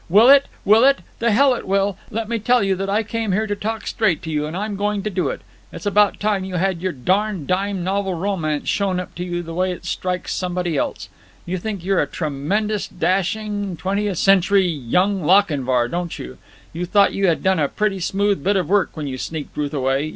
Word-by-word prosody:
"Will 215 +8 +6
it? 280 0 +7 0.2
Will 215 +3 +6
it? 275 +1 +4 0.2
The 235 - +2
hell 265 +5 +5
it 240 - -5
will. 195 0 +1
Let 225 0 -3
me 230 0 -1
tell 245 +2 +3
you 195 -1 +2
that 195 +1 -3
I 210 +3 +1
came 220 -2 -2
here 215 +3 +1
to 205 -1 -2
talk 220 +2 -4
straight 200 -9 0
to 160 - -5
you, 150 -1 -1
and 160 +3 -5
I'm 210 +1 -3
going 205 0 -1
to 215 - -2
do 185 -1 0
it. - - -5 0.3
It's - - -9
about 205 0 +3
time 205 -2 0
you 190 -1 -5
had 180 -1 0
your 185 0 -1
darned 185 +4 0
dime 190 +1 -1
novel 190 0 -1
romance 165 -5 -2
shown 195 -3 0
up 180 - -7
to 175 - -5
you 175 -1 -3
the 165 0 -7
way 185 +2 0
it 180 - -8
strikes 180 -1 -3
somebody 180 -2 -2
else. - - -2 0.4
You 185 +1 -3
think 200 -2 -5
you're 195 -1 +2
a - - -1
tremendous 190 +8 -2
dashing 195 +2 -1
twentieth 200 +1 -1
century 195 +1 +4
Young 180 - 0
Lochinvar, 145 -9 +3
don't 175 +4 -4
you? 65 - -9 0.3
You 175 +2 -4
thought 200 +2 +4
you 195 -1 +1
had 165 - +1
done 190 -2 +2
a 145 - +2
pretty 210 -2 -1
smooth 195 -1 0
bit 200 +1 +2
of 185 -5 0
work 200 0 +2
when 155 - -3
you 130 -2 -5
sneaked 155 0 -6
Ruth 145 -1 -2
away! 135 +1 0
190 Hz, 225 wpm, -21 LUFS, 170-205 Hz, 0.4 s, it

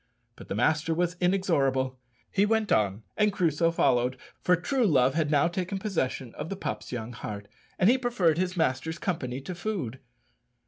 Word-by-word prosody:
But - - -12
the - - -3
master 155 +8 +2
was 175 +1 0
inexorable; 135 -9 +1 0.3
he 200 - +3
went 220 0 +1
on, 105 0 +2
and 210 -1 +3
Crusoe 165 -3 +2
followed, 125 -5 +2 0.2
for 180 - +4
true 255 - 0
love 130 -5 +4
had 155 -1 0
now 145 0 +4
taken 185 +3 -3
possession 150 - -2
of 160 - -6
the 195 - -3
pup's 195 - -5
young 120 -1 -5
heart, 100 -2 -6 0.3
and 185 - +4
he 255 +4 +5
preferred 190 -10 +2
his 185 0 -1
master's 160 +1 0
company 135 -8 -3
to 180 - -6
food. 170 - -4
165 Hz, 175 wpm, -28 LUFS, 130-185 Hz, 0.3 s, he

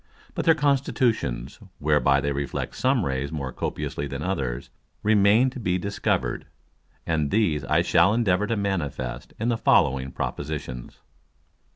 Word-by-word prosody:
But - - -3
their 165 - +6
Constitutions, 130 - 0 0.2
whereby 70 -2 +3
they 70 - -1
reflect 70 0 -3
some 130 -6 +1
Rays 65 +1 -2
more 70 -4 -4
copiously 70 - -3
than 70 +2 -5
others, 65 -10 -3 0.3
remain 105 +4 +4
to 130 - -8
be 90 -5 0
discover'd; 100 +3 -1 0.6
and 75 -3 0
these 85 -9 +1
I 65 - +2
shall 85 +4 +4
endeavour 105 -3 +2
to 115 - -1
manifest 70 -11 -3
in 115 +2 0
the 115 -2 0
following 65 0 +3
Propositions. 70 -5 -5
80 Hz, 140 wpm, -25 LUFS, 70-110 Hz, 0.6 s, their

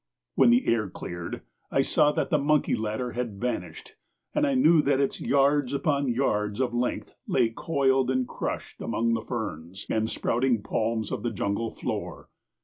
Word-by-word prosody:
When - - +5
the 245 +2 +4
air 110 -4 +1
cleared 85 -1 -6 0.3
I 135 - +2
saw 150 +1 +3
that - - -1
the 150 - +3
monkey 150 +1 +2
ladder 110 +3 -3
had 120 -5 -4
vanished 125 +2 -4 0.4
and 300 -1 +2
I 275 - +1
knew 170 -11 +5
that 140 -2 +2
its 140 - -1
yards 140 -1 +2
upon 140 -1 +1
yards 105 -4 0
of 125 -2 0
length 120 +1 -2
lay 115 - +2
coiled 135 0 +1
and 130 -1 +1
crushed - - -5
among 115 0 0
the 115 - 0
ferns 95 -6 -5
and 110 0 +1
sprouting 120 -2 0
palms 110 0 -1
of - - -3
the 120 - -1
jungle 100 +1 -2
floor. - - -5
125 Hz, 170 wpm, -27 LUFS, 110-140 Hz, 0.4 s, When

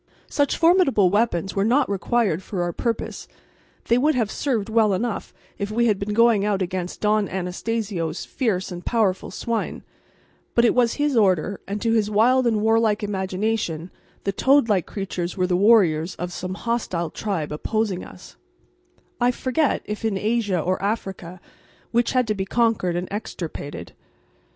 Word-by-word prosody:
Such 285 -1 +1
formidable 330 - +4
weapons 195 -4 0
were 195 - +2
not 255 +7 +3
required 200 -2 0
for 185 -2 -3
our 175 0 -2
purpose: 230 +4 -3 0.6
they 235 +1 +4
would 300 +3 +3
have 225 -4 0
served 235 -8 -1
well 220 -3 +3
enough 225 +2 -3 0.3
if 200 0 -2
we 235 +2 +1
had 210 -4 +2
been 205 +1 -3
going 230 -3 +4
out 205 -2 +1
against 185 -1 -4
Don 210 -1 +2
Anastacio's 185 -2 -3
fierce 200 -8 -1
and 175 0 -7
powerful 215 -6 0
swine; 230 -1 -3 0.7
but 235 - +5
it - - +4
was 240 -2 +2
his 290 -2 0
order, 195 -3 +2
and 200 +2 -3
to 230 - +2
his 215 -2 +2
wild 240 +4 +3
and 220 -3 +1
warlike 220 -1 +2
imagination 190 -3 -2 0.3
the 200 - 0
toad 265 +5 +3
like 200 -5 +1
creatures 185 -3 -4
were 185 - +2
the 180 -1 +1
warriors 185 -5 +4
of 180 0 -5
some 185 +1 -4
hostile 195 -8 -2
tribe 185 -9 -3
opposing 200 +4 -1
us, 180 - -13 0.8
I 245 0 +3
forget 260 +4 0
if 210 +2 -5
in 220 -3 0
Asia 210 -3 0
or 185 +4 -1
Africa, 195 -4 -4 0.5
which 240 0 +1
had 255 -1 +3
to - - +3
be 190 -2 -3
conquered 225 -5 +1
and 175 +1 -2
extirpated. 170 -8 -6
210 Hz, 165 wpm, -23 LUFS, 185-230 Hz, 0.8 s, but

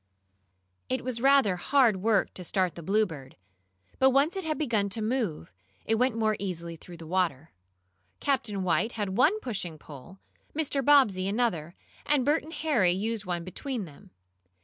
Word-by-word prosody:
It 255 -1 -1
was 245 -2 -3
rather 270 -8 +4
hard 245 0 +3
work 210 +1 +1
to 185 - -8
start 185 0 0
the 170 - -9
Bluebird, 165 -8 -1 0.6
but 265 - +6
once 280 +7 +2
it 385 - -3
had 310 -1 -2
begun 225 -9 0
to 200 - -1
move, 215 - -2 0.3
it 225 - +1
went 240 +1 +1
more 215 -1 +1
easily 170 -4 -4
through 170 +2 -12
the 165 - -10
water. 165 -4 -1 0.7
Captain 235 -9 -1
White 220 +6 +1
had 205 -3 -2
one 310 - +3
pushing 185 - -4
pole, 150 +5 -12 0.4
Mr. 285 -3 0
Bobbsey 230 -10 +4
another, 195 -7 -1 0.3
and 290 -4 +1
Bert 295 +2 +3
and 320 +2 -11
Harry 280 - +2
used 210 +2 -2
one 175 -2 -3
between 220 +5 -4
them. 175 +5 -15
215 Hz, 165 wpm, -28 LUFS, 180-260 Hz, 0.7 s, but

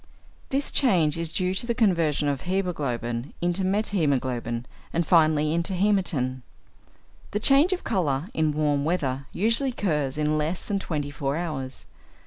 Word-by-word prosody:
This 275 +1 0
change 175 - +3
is 165 -1 -2
due 185 0 0
to 215 +5 -3
the 235 - 0
conversion 165 - +2
of 140 -2 -1
hæmoglobin 140 -10 -2
into 175 +2 0
methæmoglobin, 140 - 0 0.3
and 170 0 0
finally 155 -2 +3
into 170 +3 0
hæmatin. 175 -10 +1 0.9
The 210 - -2
change 275 - +5
of 370 - -2
colour 160 - 0
in 155 -1 +1
warm 145 -1 +1
weather 140 -5 -1
usually 230 +8 +2
occurs 150 - -1
in 155 0 +1
less 160 +4 -2
than 200 -1 -1
twenty 150 -6 -3
four 145 0 -2
hours. 135 -7 -5
160 Hz, 145 wpm, -25 LUFS, 140-190 Hz, 0.9 s, change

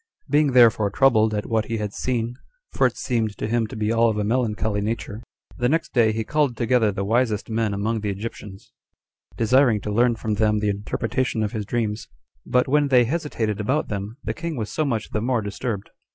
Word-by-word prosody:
Being 150 -3 +2
therefore 115 -4 +5
troubled 110 -1 +3
at 105 - -2
what 110 -2 0
he 115 - -3
had 105 -2 -4
seen, 120 -2 -2 0.4
for - - +3
it - - -7
seemed 115 -4 -1
to - - -3
him 115 0 0
to 115 - -9
be 110 0 -1
all 115 0 +3
of 110 - -2
a 105 - 0
melancholy 110 -2 0
nature, 110 0 -4 0.4
the 120 0 +2
next 165 +3 -1
day 115 -3 +4
he 110 +1 -2
called 145 -1 0
together 115 -2 +2
the 100 0 -3
wisest 115 -1 0
men 110 -1 0
among 105 +3 -1
the 105 - -2
Egyptians, 100 -1 -7 0.7
desiring 120 -1 +4
to 105 - -4
learn 120 +2 +3
from 110 -1 -3
them 105 0 +2
the 105 0 0
interpretation 110 +3 -2
of 105 - -2
his 105 -3 -4
dreams. 110 -3 -2 0.4
But 125 0 +2
when 145 +2 +3
they 125 -3 +5
hesitated 115 -8 -2
about 130 +9 0
them, 105 +3 -5
the - - -2
king 170 -1 -5
was 110 -4 -4
so 155 - 0
much 115 -6 -2
the 110 - -1
more 120 -1 0
disturbed. 100 0 -4
110 Hz, 210 wpm, -23 LUFS, 105-125 Hz, 0.7 s, therefore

